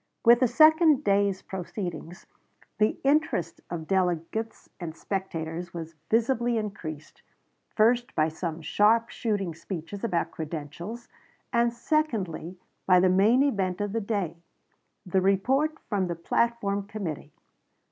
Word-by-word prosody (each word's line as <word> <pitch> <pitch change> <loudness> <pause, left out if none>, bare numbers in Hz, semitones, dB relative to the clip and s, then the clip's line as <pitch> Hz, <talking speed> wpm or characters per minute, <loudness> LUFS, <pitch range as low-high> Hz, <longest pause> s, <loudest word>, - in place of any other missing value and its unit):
With 235 +1 +7
the 255 - +4
second 310 +2 +5
day's 200 -3 +2
proceedings 180 -1 -6 0.5
the 215 0 +2
interest 275 - +1
of 165 -2 -5
delegates 185 +4 -1
and 165 -2 -6
spectators 175 -3 -4
was 165 -1 -6 0.2
visibly 235 +1 +2
increased, 170 -8 -6 0.5
first 240 +3 +3
by 155 0 +3
some 160 0 -5
sharp 225 +8 +3
shooting 200 -6 -2
speeches 170 +4 -7
about 180 -7 0
credentials, 160 +8 -6 0.5
and 235 0 +3
secondly 225 - -1 0.3
by 185 -1 +6
the 185 +1 +4
main 210 +8 +4
event 195 -10 0
of 205 -1 -2
the 225 - 0
day 200 -6 -2 0.7
the 185 +1 +1
report 265 +11 +2
from 195 -4 0
the 170 - -3
platform 200 +2 0
committee. 175 -8 -5
200 Hz, 125 wpm, -27 LUFS, 170-235 Hz, 0.7 s, With